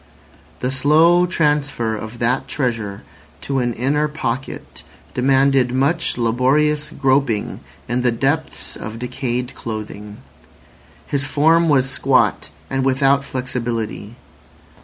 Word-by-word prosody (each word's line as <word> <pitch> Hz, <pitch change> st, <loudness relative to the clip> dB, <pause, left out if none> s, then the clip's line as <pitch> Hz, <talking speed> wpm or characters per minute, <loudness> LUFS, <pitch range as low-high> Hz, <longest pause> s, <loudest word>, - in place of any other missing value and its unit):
The 125 Hz, -, 0 dB
slow 160 Hz, +6 st, +4 dB
transfer 145 Hz, -9 st, 0 dB
of 110 Hz, +2 st, -7 dB
that 120 Hz, +2 st, 0 dB
treasure 115 Hz, -7 st, -2 dB, 0.4 s
to 135 Hz, -1 st, -1 dB
an 120 Hz, -1 st, 0 dB
inner 145 Hz, +5 st, +1 dB
pocket 135 Hz, -4 st, -5 dB, 0.3 s
demanded 135 Hz, 0 st, +3 dB
much 140 Hz, +4 st, +1 dB
laborious 135 Hz, +6 st, +1 dB
groping 130 Hz, -5 st, 0 dB, 0.3 s
in 120 Hz, +2 st, 0 dB
the 125 Hz, -1 st, +2 dB
depths 145 Hz, +6 st, -2 dB
of 110 Hz, +1 st, -7 dB
decayed 125 Hz, +1 st, -3 dB
clothing. 105 Hz, -3 st, -7 dB, 0.9 s
His 140 Hz, -1 st, -1 dB
form 160 Hz, +3 st, +3 dB
was 135 Hz, -3 st, +3 dB
squat 130 Hz, -10 st, +1 dB, 0.2 s
and 135 Hz, +7 st, -1 dB
without 135 Hz, +1 st, +3 dB
flexibility. 120 Hz, -4 st, -4 dB
130 Hz, 110 wpm, -20 LUFS, 120-145 Hz, 0.9 s, slow